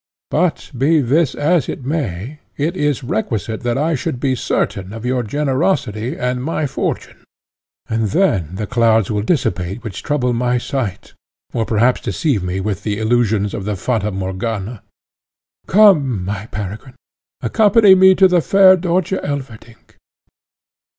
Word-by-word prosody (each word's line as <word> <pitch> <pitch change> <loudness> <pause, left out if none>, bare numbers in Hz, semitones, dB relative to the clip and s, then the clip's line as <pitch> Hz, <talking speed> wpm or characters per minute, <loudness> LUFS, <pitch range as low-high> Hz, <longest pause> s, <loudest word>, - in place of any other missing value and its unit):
But 175 0 0
be 150 +6 +3
this 140 +2 +1
as 155 -1 +1
it 130 - -6
may, 135 - -3 0.2
it 160 +5 -1
is 145 -5 -1
requisite 110 -2 -3
that 120 0 -1
I 155 +4 +1
should 130 -3 -3
be 130 0 0
certain 95 -5 -2
of 115 +1 -7
your 125 0 0
generosity 130 - -1
and 125 0 -2
my 155 +1 -1
fortune, 140 - -4 0.6
and 110 -1 -1
then 95 - 0
the 105 +2 -3
clouds 115 -3 +2
will 105 -1 0
dissipate 100 - -1
which 110 -5 -6
trouble 125 -4 0
my 125 +1 0
sight, 120 -6 -4 0.4
or 115 -2 -1
perhaps 120 +3 +2
deceive 140 - -1
me 90 +1 -3
with 100 0 -3
the 105 -1 -2
illusions 110 -2 +1
of 100 - -4
the 105 -1 -2
Fata 105 +1 -1
Morgana. 100 +3 -4 0.9
Come, 150 - +4
my 100 +2 -4
Peregrine, 105 +5 -7 0.5
accompany 205 - +5
me 190 0 +6
to 190 0 +6
the 180 -2 +2
fair 190 +2 +6
Dörtje 180 +1 -1
Elverdink." 130 -5 -7
125 Hz, 145 wpm, -18 LUFS, 105-150 Hz, 0.9 s, me